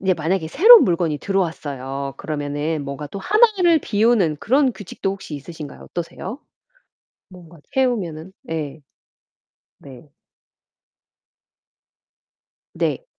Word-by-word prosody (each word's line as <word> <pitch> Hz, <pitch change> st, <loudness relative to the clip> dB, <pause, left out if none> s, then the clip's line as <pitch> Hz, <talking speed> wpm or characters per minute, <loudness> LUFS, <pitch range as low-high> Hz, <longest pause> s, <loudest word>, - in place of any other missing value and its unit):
이제 190 Hz, -1 st, +2 dB
만약에 160 Hz, +1 st, -1 dB
새로운 440 Hz, -, +8 dB
물건이 170 Hz, -4 st, 0 dB
들어왔어요. 140 Hz, -8 st, -3 dB
그러면은 145 Hz, 0 st, -3 dB
뭔가 140 Hz, +2 st, -6 dB
또 200 Hz, -, -7 dB
하나를 385 Hz, -, +4 dB
비우는 210 Hz, -7 st, +2 dB
그런 265 Hz, +2 st, +2 dB
규칙도 195 Hz, -2 st, -5 dB
혹시 190 Hz, -6 st, -8 dB
있으신가요? 150 Hz, +1 st, -9 dB
어떠세요? 175 Hz, -, -6 dB, 0.9 s
뭔가 175 Hz, -2 st, -15 dB
채우면은 190 Hz, -10 st, -1 dB, 0.2 s
예. 155 Hz, -2 st, -4 dB, 1.0 s
네. 140 Hz, +2 st, -14 dB, 2.6 s
네. -, -, -2 dB
170 Hz, 245 characters per minute, -21 LUFS, 150-220 Hz, 2.6 s, 새로운